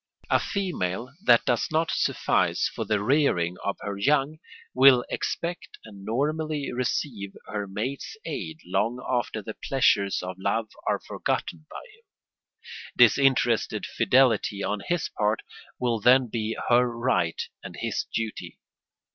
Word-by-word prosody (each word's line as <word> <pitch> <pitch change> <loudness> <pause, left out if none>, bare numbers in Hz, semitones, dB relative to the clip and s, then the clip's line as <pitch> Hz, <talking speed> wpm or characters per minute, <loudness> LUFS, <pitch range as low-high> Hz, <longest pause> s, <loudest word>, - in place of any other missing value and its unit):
A - - +5
female 125 - -2
that 120 - +5
does 120 -2 +1
not 160 +1 +1
suffice - - +1
for - - -5
the 105 -2 0
rearing 105 - +2
of 100 - -2
her 100 -1 -5
young 145 +6 +1 0.3
will 130 -1 +6
expect 170 +1 -4
and 100 -3 -12
normally 150 +6 -1
receive 120 -5 -2
her 105 -1 -4
mate's 120 - -5
aid 80 - -5
long 100 +7 0
after 120 -4 -1
the 110 - -6
pleasures 100 -9 +1
of 90 0 -6
love 110 +3 -1 0.2
are - - +1
forgotten 80 -2 -3
by - - -8
him. 460 +2 -24 0.9
Disinterested 130 -4 +3
fidelity 115 -6 +2
on 100 +2 -1
his 175 - -1
part 105 +1 -1 0.4
will 120 -3 0
then 125 +4 +5
be 110 0 -3
her 125 0 +4
right 115 -9 0 0.2
and - - -8
his - - -3
duty. 115 -1 -4
115 Hz, 135 wpm, -26 LUFS, 100-135 Hz, 0.9 s, will